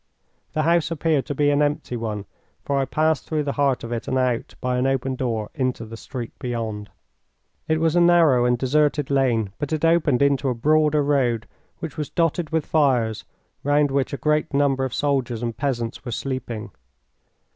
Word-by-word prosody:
The 155 Hz, 0 st, 0 dB
house 170 Hz, 0 st, +2 dB
appeared 160 Hz, -3 st, 0 dB
to 145 Hz, -, -3 dB
be 145 Hz, +1 st, +3 dB
an 145 Hz, +1 st, +2 dB
empty 145 Hz, -3 st, -1 dB
one, 110 Hz, -3 st, -4 dB, 0.4 s
for 140 Hz, -1 st, 0 dB
I 135 Hz, -, +1 dB
passed 155 Hz, +1 st, 0 dB
through 155 Hz, -1 st, 0 dB
the 140 Hz, -, -1 dB
heart 140 Hz, -2 st, +1 dB
of 115 Hz, -, -6 dB
it 115 Hz, -1 st, -4 dB
and 130 Hz, -, 0 dB
out, 125 Hz, -2 st, -1 dB
by 125 Hz, -1 st, -1 dB
an 130 Hz, -, +1 dB
open 135 Hz, 0 st, 0 dB
door, 115 Hz, -5 st, -2 dB
into 130 Hz, -5 st, -2 dB
the 115 Hz, +1 st, -9 dB
street 120 Hz, +1 st, -7 dB
beyond. 110 Hz, -4 st, -4 dB, 0.8 s
It 160 Hz, 0 st, +1 dB
was 165 Hz, 0 st, +1 dB
a 175 Hz, -, +5 dB
narrow 165 Hz, -8 st, +5 dB
and 125 Hz, 0 st, +2 dB
deserted 145 Hz, +2 st, +1 dB
lane, 120 Hz, -7 st, +1 dB
but 145 Hz, -, -3 dB
it 155 Hz, 0 st, 0 dB
opened 155 Hz, -6 st, +3 dB
into 140 Hz, -1 st, +2 dB
a 125 Hz, -, -1 dB
broader 150 Hz, +3 st, +3 dB
road, 125 Hz, -6 st, +1 dB, 0.3 s
which 165 Hz, -1 st, -7 dB
was 150 Hz, -2 st, -3 dB
dotted 165 Hz, -1 st, 0 dB
with 160 Hz, -2 st, 0 dB
fires, 125 Hz, -8 st, +1 dB, 0.4 s
round 145 Hz, 0 st, +2 dB
which 135 Hz, -1 st, 0 dB
a 140 Hz, -, -3 dB
great 150 Hz, -1 st, 0 dB
number 140 Hz, -2 st, +2 dB
of 130 Hz, -, -4 dB
soldiers 130 Hz, -5 st, 0 dB
and 115 Hz, -1 st, -2 dB
peasants 120 Hz, -4 st, -3 dB
were 125 Hz, -, -5 dB
sleeping. 120 Hz, -4 st, -4 dB
135 Hz, 190 wpm, -23 LUFS, 120-150 Hz, 0.8 s, a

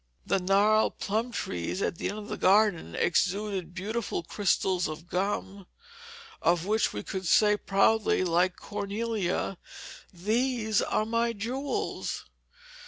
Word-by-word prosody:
The 195 Hz, -, +1 dB
gnarled 200 Hz, +4 st, +3 dB
plum 220 Hz, +4 st, -1 dB
trees 90 Hz, -, -3 dB
at 180 Hz, -, -2 dB
the -, -, -1 dB
end 205 Hz, -, -5 dB
of 210 Hz, -1 st, -7 dB
the -, -, -3 dB
garden 195 Hz, -, +3 dB
exuded 190 Hz, -1 st, 0 dB
beautiful 205 Hz, 0 st, -3 dB
crystals 185 Hz, 0 st, +1 dB
of 155 Hz, +2 st, -7 dB
gum, 195 Hz, +1 st, -2 dB, 0.7 s
of 170 Hz, 0 st, +2 dB
which 215 Hz, +2 st, +1 dB
we 105 Hz, -, -5 dB
could 190 Hz, -2 st, -4 dB
say 210 Hz, +4 st, +5 dB
proudly, 205 Hz, 0 st, +2 dB
like 180 Hz, +1 st, +2 dB
Cornelia, 205 Hz, -2 st, -3 dB, 0.5 s
"These 220 Hz, +3 st, 0 dB
are 215 Hz, -, 0 dB
my 230 Hz, +1 st, 0 dB
jewels." 250 Hz, +7 st, -3 dB
200 Hz, 125 wpm, -28 LUFS, 180-220 Hz, 0.7 s, say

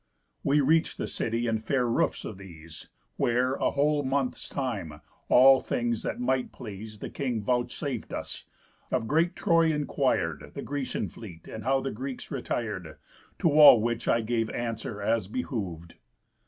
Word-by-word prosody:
We 145 Hz, +1 st, +3 dB
reach'd 160 Hz, +4 st, +2 dB
the -, -, -2 dB
city 115 Hz, +1 st, -2 dB
and 110 Hz, -1 st, -1 dB
fair 130 Hz, 0 st, +1 dB
roofs 115 Hz, -, 0 dB
of 100 Hz, -3 st, -7 dB
these, 85 Hz, -4 st, -11 dB, 0.3 s
Where, 125 Hz, +2 st, +2 dB
a -, -, +1 dB
whole 145 Hz, +1 st, +2 dB
month's 135 Hz, -1 st, -2 dB
time, 105 Hz, -, -4 dB, 0.3 s
all 130 Hz, +1 st, +8 dB
things 120 Hz, -2 st, -1 dB
that -, -, -4 dB
might 130 Hz, +1 st, 0 dB
please 110 Hz, -2 st, -9 dB
The -, -, -6 dB
king 125 Hz, -6 st, -2 dB
vouchsaf'd 125 Hz, +2 st, -2 dB
us; -, -, -5 dB, 0.4 s
of 115 Hz, -, -1 dB
great 165 Hz, +5 st, +2 dB
Troy 165 Hz, -4 st, +3 dB
inquir'd, 135 Hz, -, -1 dB
The -, -, -5 dB
Grecian 140 Hz, -2 st, -3 dB
fleet, 90 Hz, -8 st, -11 dB
and 110 Hz, -, -7 dB
how 135 Hz, 0 st, +2 dB
the 135 Hz, -, -3 dB
Greeks 130 Hz, +4 st, -6 dB
retir'd. 105 Hz, -, -4 dB, 0.4 s
To 165 Hz, -, +2 dB
all 150 Hz, -5 st, +9 dB
which 115 Hz, +1 st, -2 dB
I 115 Hz, -, +3 dB
gave 115 Hz, 0 st, -1 dB
answer 115 Hz, -3 st, -4 dB
as 110 Hz, -2 st, +1 dB
behov'd. 95 Hz, -8 st, -4 dB
120 Hz, 155 wpm, -28 LUFS, 105-135 Hz, 0.4 s, all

